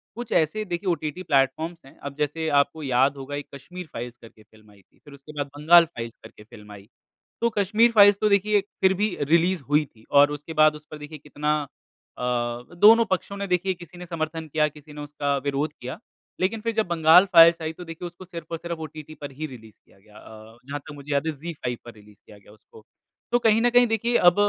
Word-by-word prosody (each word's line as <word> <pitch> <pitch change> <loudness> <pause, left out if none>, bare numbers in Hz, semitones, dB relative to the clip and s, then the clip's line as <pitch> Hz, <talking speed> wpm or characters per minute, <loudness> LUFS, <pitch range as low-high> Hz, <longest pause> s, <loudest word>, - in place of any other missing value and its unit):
कुछ 240 0 -7
ऐसे 160 +7 +1
देखिए 180 0 -3
ओटीटी 165 +1 -3
प्लेटफ़ॉर्म्स 155 +3 0
हैं। 135 - -18
अब 140 0 -8
जैसे 150 +2 -2
आपको 145 +2 -1
याद 135 +2 +2
होगा, 140 +1 -6
एक 145 - -6
कश्मीर 180 +6 -10
फ़ाइल्स 120 +1 -7
करके 110 -2 -17
फ़िल्म 110 -1 -22
आयी 100 -1 -21
थी। - - -34
फिर 145 - -14
उसके 140 +2 -13
बाद 145 -1 -2
बंगाल 170 +3 +6
फ़ाइल्स 115 -8 -8
करके 110 -1 -14
फ़िल्म 105 -1 -15
आयी। 100 0 -13 0.5
तो 235 - +3
कश्मीर 215 +4 +3
फ़ाइल्स 205 -2 +6
तो 215 - +2
देखिए 205 0 +3 0.2
फिर 190 0 +4
भी 210 -2 0
रिलीज़ 170 +3 +2
हुई 150 +1 +3
थी 110 -4 -23
और 145 +1 +6
उसके 150 +2 -7
बाद 155 0 +5
उस 150 0 -13
पर 155 - -7
देखिए 150 +1 -9
कितना 150 +1 -2 0.6
अ, - - -6 0.6
दोनों 225 +4 +8
पक्षों 190 +1 -3
ने 200 - -3
देखिए, 180 +1 0
किसी 175 0 -14
ने 180 - -8
समर्थन 160 -1 -4
किया, 150 +1 +1
किसी 150 0 -13
ने 150 - -8
उसका 145 -1 -2
विरोध 140 +2 -1
किया, 125 +1 -6 0.4
लेकिन 210 +4 -1
फिर 230 0 -2
जब 220 0 +1
बंगाल 170 +2 +6
फ़ाइल्स 165 0 +7
आयी, 160 0 -3
तो 180 - -10
देखिए 165 +2 -8
उसको 175 +2 -13
सिर्फ़ 170 -2 -9
और 165 - -2
सिर्फ़ 170 0 -6
ओटीटी 155 0 -9
पर 145 -1 -6
ही 155 +4 -6
रिलीज़ 110 -5 -13
किया - - -25
गया। 105 +1 -19
अ, 110 +1 -14
जहाँ 145 +2 -5
तक 145 - -12
मुझे 145 +1 -9
याद 140 +2 0
है 160 - +1
ज़ी 160 +4 -7
फ़ाइव 125 -5 -4
पर 120 - -10
रिलीज़ 105 -1 -20
किया 105 - -15
गया 100 - -20
उसको। 110 +1 -19 0.5
तो 240 - +3
कहीं 225 -1 +3
न 245 - +4
कहीं 245 0 +5
देखिए 230 +2 0
अब 175 - -8
155 Hz, 230 wpm, -24 LUFS, 140-180 Hz, 0.6 s, दोनों